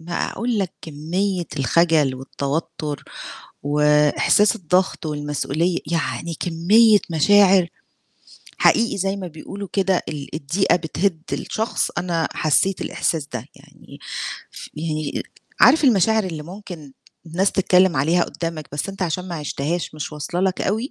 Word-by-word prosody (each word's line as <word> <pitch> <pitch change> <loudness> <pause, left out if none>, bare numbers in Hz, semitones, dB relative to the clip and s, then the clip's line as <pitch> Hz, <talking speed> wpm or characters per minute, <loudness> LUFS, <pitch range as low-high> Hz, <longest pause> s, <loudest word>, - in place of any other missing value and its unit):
بقى 170 +1 -3
أقول 235 -2 -1
لك 190 -3 -2
كمية 175 +5 -2
الخجل 150 0 +3
والتوتُّر 145 +3 -4 0.6
وإحساس 150 +8 +3
الضغط 185 -1 0
والمسؤولية، 150 +3 -1
يعني 165 0 -2
كمية 205 +6 +5
مشاعر 190 +2 +5 0.9
حقيقي 230 -2 +3
زي 195 +1 -1
ما 190 -2 -5
بيقولوا 190 +4 -8
كده 190 -2 +1
ال 145 -2 -7
الضيقة 165 +7 +1
بتهد 165 0 -2
الشخص، 220 +1 -1
أنا 170 -2 -1
حسّيت 180 +5 +1
الإحساس 155 -4 -1
ده، 125 -2 -6
يعني - - -16 0.5
ف - - -10
يعني 155 -1 -3 0.4
عارف 315 -1 +6
المشاعر 220 -2 +4
اللي 160 -5 -5
ممكن 175 -4 -10 0.3
الناس 180 +5 +1
تتكلّم 185 -3 +3
عليها 165 +6 +2
قدّامك 165 -3 -5
بس 145 +6 -3
أنت 195 -1 -5
عشان 180 +2 -2
ما 175 - -4
عِشتهاش 155 +2 -3
مش 155 0 -5
واصلة 160 +4 -3
لك 190 -1 0
أوي؟ 220 +8 -1
170 Hz, 130 wpm, -21 LUFS, 150-195 Hz, 0.9 s, عارف